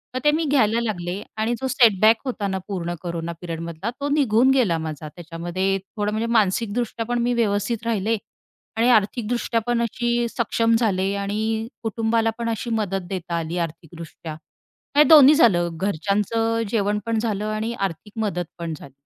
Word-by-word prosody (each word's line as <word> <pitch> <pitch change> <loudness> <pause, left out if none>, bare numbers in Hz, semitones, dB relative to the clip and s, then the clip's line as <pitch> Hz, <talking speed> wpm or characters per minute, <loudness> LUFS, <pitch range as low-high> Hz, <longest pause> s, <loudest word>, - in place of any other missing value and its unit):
मग - - 0
ते 295 - +6
मी 320 +2 0
घ्यायला 235 -6 +3
लागले 185 -4 -3 0.2
आणि 220 +2 0
जो 265 - 0
सेटबॅक 225 -3 +5
होता 230 -6 -2
ना 190 -1 -2
पूर्ण 175 -3 -3
कोरोना 170 -1 -4
पिरियडमधला 170 +3 -5
तो 285 - -1
निघून 260 -4 +3
गेला 235 -11 +2
माझा 155 -1 -5
त्याच्यामध्ये. 175 +4 -2 0.2
थोडं 210 0 0
म्हणजे 220 +2 -1
मानसिकदृष्ट्या 225 +2 0
पण 240 +1 -1
मी 245 +1 +1
व्यवस्थित 230 0 0
राहिले 225 0 0 0.6
आणि 235 +2 +3
आर्थिकदृष्ट्या 230 +1 +1
पण 240 -1 +1
अशी 235 +1 0
सक्षम 230 -1 +1
झाले 195 -4 +1
आणि 220 +3 -2 0.2
कुटुंबाला 225 0 +1
पण 230 -1 -2
अशी 230 +2 -3
मदत 205 -4 -1
देता 175 -3 -4
आली 165 +2 -4
आर्थिकदृष्ट्या. 165 -1 -6 0.6
हे 295 - +9
दोन्ही 300 -2 +8
झालं, 180 - +4
घरच्यांचं 210 +5 0
जेवण 210 -1 0
पण 230 -1 0
झालं 215 -2 -2
आणि 215 +2 -2
आर्थिक 195 -1 -4
मदत 180 -4 -2
पण 170 -2 -4
झाली, 140 -2 -11
215 Hz, 160 wpm, -23 LUFS, 185-235 Hz, 0.6 s, हे